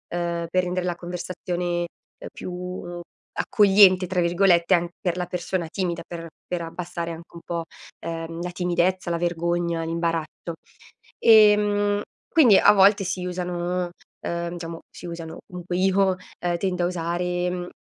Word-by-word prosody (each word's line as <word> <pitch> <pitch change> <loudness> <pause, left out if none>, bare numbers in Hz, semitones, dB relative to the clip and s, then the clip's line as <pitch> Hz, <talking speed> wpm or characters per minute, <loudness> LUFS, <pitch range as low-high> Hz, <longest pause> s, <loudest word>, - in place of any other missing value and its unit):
uhm, 170 -1 -2
per 185 +1 +2
rendere 180 0 -2
la 175 -1 -1
conversazione 175 0 -3 0.5
più 180 -1 -6 0.3
"accogliente" 195 -3 +5
tra 180 0 -1
virgolette, 175 0 +4
anc 175 0 -1
per 180 -1 -1
la 180 - -1
persona 180 0 -3
timida, 175 -1 -2
per 165 -1 -7 0.2
per 175 -1 -1
abbassare 170 0 -5
anche 165 +1 -10
un - - -7
po', 170 -1 -2 0.4
ehm, 165 0 -4
la 180 - -3
timidezza, 180 +1 0
la 170 - 0
vergogna, 170 0 -1
l'imbarazzo. 165 0 -2 0.6
Ehm, 210 -2 +5 0.3
quindi 250 - +6
a - - +7
volte 200 0 +5
si 185 0 -3
usano, 180 0 -2 0.3
uhm, 170 0 -3
diciamo 165 -1 -6
si 175 - -11
usano, 165 -1 -7
comunque 180 0 -4
io, 190 +1 +3 0.3
uhm, 175 -1 0
tendo 180 -1 0
a - - +3
usare, 175 +1 -1
mhmm, 180 - -2
uhm, 175 0 -5
175 Hz, 150 wpm, -24 LUFS, 170-185 Hz, 0.6 s, a